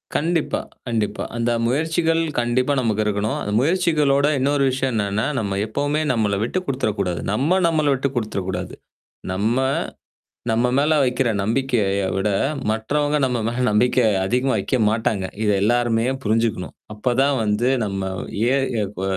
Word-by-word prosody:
கண்டிப்பா, 165 0 0 0.3
கண்டிப்பா. 110 -3 -1
அந்த 120 0 0 0.2
முயற்சிகள் 160 +5 +1 0.2
கண்டிப்பா 125 +3 +1
நமக்கு 110 -4 0
இருக்கணும். 105 +1 -1
அந்த 105 - -3
முயற்சிகளோட 150 -2 +2
இன்னொரு 140 +1 +1
விஷயம் 130 0 -1
என்னன்னா, 105 0 0
நம்ம 100 -2 -2
எப்பவுமே 145 +7 -1
நம்மள 105 -5 +1
விட்டுக் 185 +10 -2
குடுத்துரக்கூடாது. 100 -9 -1
நம்ம, 140 - +2
நம்மள 155 -3 +1
விட்டுக் 135 0 -2
குடுத்துரக்கூடாது. 95 -5 -3 0.6
நம்ம, 105 +5 0 1.0
நம்ம 115 +2 +2
மேல 150 +3 +3
வைக்கிற 125 0 +1
நம்பிக்கையை 105 -4 0
விட, 95 +2 0 0.4
மற்றவங்க 145 +7 0
நம்ம 125 -2 -1
மேல 120 +2 -2
நம்பிக்கைய 120 +2 +3 0.2
அதிகமா 125 +5 +1
வைக்க 100 +6 0
மாட்டாங்க. 110 -3 0 0.2
இதை 105 -1 +2
எல்லாருமே 120 0 +2 0.2
புரிஞ்சுக்கணும். 110 -3 0 0.2
அப்பதான் 130 +6 +1
வந்து 105 +4 +1 0.2
நம்ம 100 -1 -3 0.5
எ - - +3 0.2
எ - - +1
இப்ப 95 -2 -7
120 Hz, 135 wpm, -21 LUFS, 105-140 Hz, 1.0 s, மேல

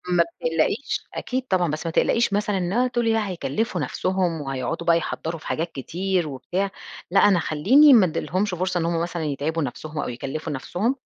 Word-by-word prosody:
ما 170 - +6
بتقلقيش. 165 - -1
أكيد 255 +1 -3
طبعًا 180 -6 +1
بس 155 +2 -4
ما 165 - -1
تقلقيش 230 +6 +2
مثلًا 205 0 0
إن 180 0 -1
هو 250 +3 +3
تقولي 240 -2 +1
لأ 220 -2 0
هيكلفوا 190 - -2
نفسهم 185 -4 -1
وهيقعدوا 135 +3 -3
بقى 170 -1 +6
يحضَّروا 165 0 -4
في - - -11
حاجات 165 +1 -2
كتير 180 +5 -2
وبتاع، 175 +8 -3 0.4
لأ 195 - +5
أنا 195 -4 +5
خلّيني 260 - +5
ما 220 -6 +7
اديلهمش 185 +4 -1
فرصة 180 0 -1
إن 165 - -1
هُم 170 0 0
مثلًا 170 -1 -3
يتعبوا 150 +3 -1
نفسهم 150 +4 -5
أو - - -2
يكلفوا 135 +6 -5
نفسهم؟ 190 - -1
175 Hz, 190 wpm, -23 LUFS, 155-200 Hz, 0.4 s, ما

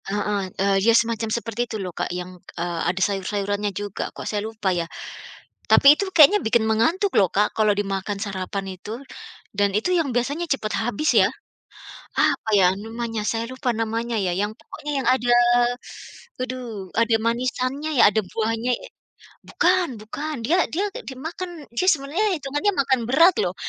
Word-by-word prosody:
Heeh, 205 -1 -1
eee, 195 0 +2
ya 230 +3 +4
semacam 230 -1 0
seperti 230 0 -2
itu 220 - -4
loh, 185 -4 -5
Kak. - - -3
Yang, 180 0 -6 0.2
eee, 170 0 -3
ada 185 +1 -2
sayur-sayurannya 205 +1 -2
juga 205 +1 -5
kok, - - -7
saya 210 -1 -2
lupa 215 -4 -1
ya. 170 -1 -2 0.8
Tapi 280 +1 +8
itu 400 - -2
kayaknya 370 +4 +6
bikin 220 0 +2
mengantuk 325 - +1
loh 190 -4 +4
Kak. 210 +1 +1
Kalau 215 -1 +3
dimakan 200 0 -2
sarapan 195 -1 -4
itu 205 +4 -8 0.6
dan 200 0 +2
itu 290 - -2
yang 325 -6 +1
biasanya 285 +8 -1
cepat 220 -6 -1
habis 240 +7 0
ya, - - +4 0.9
apa 220 - +2
ya 185 - +6 0.2
namanya 225 -1 -4
saya 225 0 -2
lupa 260 0 -2
namanya 230 +1 -2
ya, 185 -3 0
yang 205 +2 -1
pokoknya, 295 - -8
yang - - -1
ada, 245 -2 +2 1.1
aduh 240 -7 -5
ada 230 0 +3
manisannya 255 +5 -1
ya. - - +7
Ada 220 - +1
buahnya 225 +2 -1
ya. - - -10 0.6
Bukan 360 0 +2
bukan. 300 +8 -5
Dia 340 +7 +3
dia 385 +6 0 0.2
dimakan 325 +3 -7
dia 370 - +1
sebenarnya 305 +8 0
itungannya 290 +8 -1
makan 265 -2 +2
berat 330 +8 +6
loh, - - -1
225 Hz, 160 wpm, -23 LUFS, 205-275 Hz, 1.1 s, Tapi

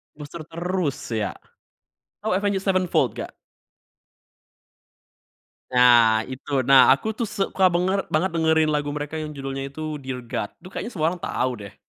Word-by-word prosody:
Booster 150 +2 -9
terus, 170 -4 -3
ya? 110 -4 -2 0.9
Oh 205 -3 0
Avenged 200 -1 0
Sevenfold 185 -2 +1
nggak? - - -6 2.4
Nah, 120 -3 +6
itu, 130 +2 -8 0.2
nah, 135 -1 +8
aku - - 0
tuh 235 - 0
suka 195 -2 -1
banger 185 +3 +1
banget 175 +5 +2
dengerin 160 -1 +3
lagu 145 -1 -1
mereka 150 +1 -4
yang 155 -1 -4
judulnya 135 -1 -5
itu 155 +1 -5
Dear 130 -1 -5
God, 105 - -2
tuh - - -11
kayaknya 230 - -5
semua 160 -3 +1
orang 175 0 -5
tau, 130 - -1
deh. 100 -3 -10
155 Hz, 145 wpm, -23 LUFS, 135-180 Hz, 2.4 s, nah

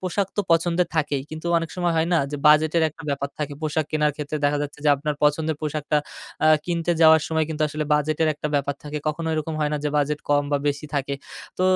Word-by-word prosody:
পোশাক 185 +1 -1
তো 205 - +3
পছন্দের 170 +1 +2
থাকেই 145 -3 0
কিন্তু 160 +2 -7
অনেক 165 -1 -5
সময় 175 -1 +1
হয় 160 +1 +2
না? 170 - +4
যে 145 - -3
বাজেটের 155 +2 +4
একটা 160 - -14
ব্যাপার 140 0 -2
থাকে। 145 -1 -3
পোশাক 155 0 0
কেনার 150 -1 +1
ক্ষেত্রে 150 0 -4
দেখা 145 0 +2
যাচ্ছে 145 0 -6
যে - - +4
আপনার 150 +1 -2
পছন্দের 150 +1 +2
পোশাকটা 150 0 -1 0.5
আ - - +5 0.2
কিনতে 175 0 0
যাওয়ার 160 -1 +7
সময় 160 -1 +1
কিন্তু 155 0 -2
আসলে 150 +1 -3
বাজেটের 155 +2 +1
একটা 150 - -4
ব্যাপার 140 0 0
থাকে। 150 +1 -4
কখনো 160 +2 -3
এরকম 155 +1 -2
হয় 150 0 +1
না 150 - +1
যে - - +2
বাজেট 150 0 0
কম 145 0 +3
বা 145 - +3
বেশি 145 +1 -3
থাকে। 140 0 -1 0.4
তো 185 - +1
150 Hz, 225 wpm, -23 LUFS, 145-160 Hz, 0.5 s, যাওয়ার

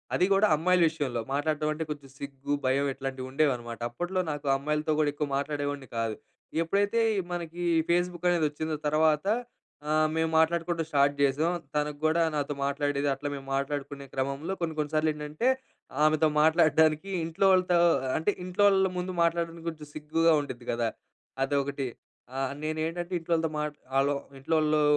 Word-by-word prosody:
అదీ 180 - +3
కూడా 200 +2 +4
అమ్మాయిల 180 +3 +2
విషయంలో 140 -7 -3
మాట్లాడటం 150 +1 0
అంటే, 155 +1 -3
కొంచెం 140 -2 -7
సిగ్గు, 140 0 -5
భయం, 135 +2 +2
ఇట్లాంటివుండేవనమాట. 130 -2 -2
అప్పట్లో 175 +9 -1
నాకు 145 -1 -5
అమ్మాయిలతో 150 +2 -1
కూడా, 150 -1 +2
ఎక్కువ 145 0 -3
మాట్లాడేవాడిని 145 -2 -3
కాదు. 115 -1 -1 0.5
ఎప్పుడైతే 200 +6 +1 0.2
ఈ - - +1
మనకీ 175 0 -4 0.3
పేస్‌బుక్ 175 0 0
అనేది 170 -3 +2
వచ్చిందో 155 +1 -3
తరవాత 155 +1 +3 0.6
ఆహ్, 155 0 +3
మేము 160 0 +1
మాట్లాడుకోవడం 165 +1 +1
స్టార్ట్ 140 -2 +3
జేసాం. 140 +4 +2 0.2
తనకు 150 0 -1
కూడా 160 +2 +3
నాతో 145 -1 -1
మాట్లాడేది. 145 0 0
అట్ల 135 +2 -3
మేము 135 -1 -8
మాట్లాడుకునే 140 0 -3
క్రమంలో, 140 +7 -2
కొన్ని, 165 -1 -1
కొన్ని 150 0 -1
సార్లేంటంటే, 155 +6 0 0.5
ఆమెతో 155 +1 +4
మాట్లాడడానికి 160 +2 +4 0.2
ఇంట్లో 165 +4 0
వాళ్ళతో 180 -1 +3 0.4
అంటే 160 +6 +1
ఇంట్లో 185 +3 +2
వాళ్ళ 190 -1 +4
ముందు 180 +1 -3
మాట్లాడడానికి, 170 0 0
కొంచెం 155 -2 -9
సిగ్గుగా 160 +2 +2
ఉండిద్ది 125 -4 -7
కదా! 115 -1 0 0.5
అదొకటి. 140 0 -1 0.5
ఆహ్, 135 0 -1
నేనేంటంటే, 165 +3 -3
ఇంట్లోళ్ళోతో 165 -1 0
మాట్ 150 -1 -3 0.2
ఆలో 140 +1 +2 0.2
ఇంట్లోళ్ళూ 155 +1 +2
155 Hz, 145 wpm, -28 LUFS, 140-165 Hz, 0.6 s, కూడా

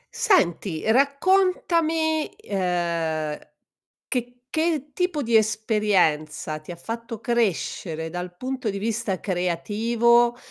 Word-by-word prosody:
Senti, 190 - +1
raccontami, 320 - +2
ehm, 170 - -1 0.7
che 245 -1 -2 0.2
che 315 -2 0
tipo 360 -4 -1
di 230 -1 +4
esperienza 205 -9 +1
ti 155 +3 -10
ha - - -6
fatto 230 +4 -6
crescere 195 - -1
dal 180 +1 -6
punto 255 +1 -3
di 200 - -3
vista 215 -2 -2
creativo? 225 +7 +2
220 Hz, 95 wpm, -24 LUFS, 180-270 Hz, 0.7 s, di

